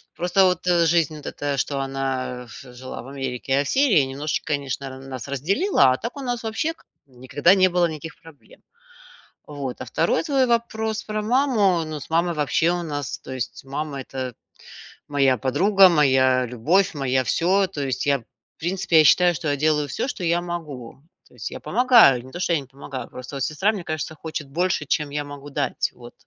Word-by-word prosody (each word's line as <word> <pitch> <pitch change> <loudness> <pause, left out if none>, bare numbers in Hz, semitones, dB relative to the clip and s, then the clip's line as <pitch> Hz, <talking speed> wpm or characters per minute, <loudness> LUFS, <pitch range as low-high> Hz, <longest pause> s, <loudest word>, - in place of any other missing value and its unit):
Просто, 180 +2 +3
вот, 180 0 0
жизнь 170 -3 +2
от 145 - -12
эта, 145 -1 -3
что 140 +1 -1
она 135 -2 -3
в 125 +2 -12
жила 130 +1 -8
в 120 - -12
Америке, 135 -2 -5
я 140 - +3
в 140 - -6
Сирии, 245 - +3
немножечко, 145 +3 -3
конечно, 140 -1 -3
она 130 0 -9
нас 135 -2 -8
разделила, 155 - +2
а 130 - 0
так 235 - -6
у - - -5
нас 245 -2 -3
вообще 225 +9 -2
к - - -27 0.2
никогда 130 +7 +2
не 185 -1 +5
было 175 0 +2
никаких 160 +1 -8
проблем. 165 -3 -17 0.9
Вот, 140 -4 -6
а - - -4
2 - - 0
твой 270 -4 +2
вопрос 220 -2 -1
про 215 0 -3
маму, 215 - +2
ну, 155 -1 -6
с 130 - -11
мамой, 170 +1 +1
вообще, 150 +3 +1
у 175 0 -2
нас, 145 -5 -4
то - - -10
есть 130 +1 -5
мама- 140 +1 -4
это 130 -2 -6 0.7
моя 135 -3 +2
подруга, 190 - +5
моя 130 -5 +3
любовь, 155 - +1
моя 130 -2 0
всё, 185 +9 +2
то 145 - -6
есть, 130 - -2
я 140 -4 +1 0.3
в - - -16
принципе, 175 -1 +1
я - - +7
считаю, 175 +3 +5
что 165 0 -5
я 145 - +1
делаю 150 0 +1
всё, 125 - -3
что 245 -8 -5
я 170 0 +2
могу. 150 -8 -7 0.3
То - - -24
есть - - -5
я - - -7
помогаю, 235 - +5
не 130 - -12
то 175 - -7
что 180 - 0
я 160 - +2
не 135 - -10
помогаю, 135 -2 -8
просто, 130 +2 -9
вот, 135 - -2
сестра, 170 +9 +1
мне 195 -5 -6
кажется, 155 0 -4
хочет 155 -1 -6
больше, 175 0 0
чем 150 +1 -1
я 145 0 -2
могу 145 0 -10
дать. - - -1
Вот. 120 -1 -13
150 Hz, 205 wpm, -23 LUFS, 135-180 Hz, 0.9 s, я